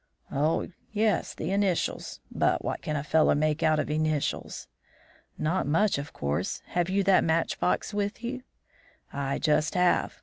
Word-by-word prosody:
"Oh, 150 +4 +1 0.2
yes, 215 -1 0
initials; 195 -3 -1
but - - +1
what - - -2
can 150 - -3
a 140 - -1
fellow 155 0 +3
make 155 +1 +1
out 155 -1 +3
of 150 - -1
initials?" 155 -1 -1 0.7
"Not 165 +2 0
much, 190 +2 +2
of 145 - -6
course. 70 +1 -2
Have 175 0 0
you 195 +1 +2
that 195 0 +5
match 165 0 0
box 180 - 0
with 205 +3 -2
you?" 255 +2 -4 0.7
"I 140 -1 -1
just 155 +1 +1
have. 180 -1 +2
160 Hz, 155 wpm, -28 LUFS, 150-195 Hz, 0.7 s, that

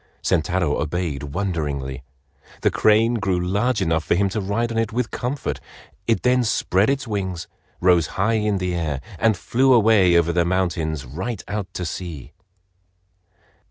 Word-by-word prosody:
Sentaro 85 -2 +1
obeyed 75 -2 -2
wonderingly. 70 -5 -3 0.6
The - - +3
crane 115 +2 +3
grew 95 -3 0
large 105 +7 0
enough 80 -1 +1
for - - +1
him 100 +2 +2
to 105 +2 -2
ride 110 +5 -1
on 115 - -1
it 115 0 -1
with 120 +1 -2
comfort. 130 +3 -3 0.5
It 115 - +1
then 125 0 +3
spread 110 -3 +1
its 140 -1 -1
wings, 95 -5 -3 0.3
rose 90 -3 +4
high 105 +4 +2
in 105 -1 +1
the 90 -1 -2
air, 80 -5 -2 0.2
and 110 -3 +3
flew 130 +7 +2
away 105 -7 +5
over 85 0 +2
the 85 0 +3
mountains 85 -5 -1
right 95 - -5
out 105 -3 -4
to 90 - -3
sea. 80 -4 -6
95 Hz, 160 wpm, -22 LUFS, 85-110 Hz, 0.6 s, away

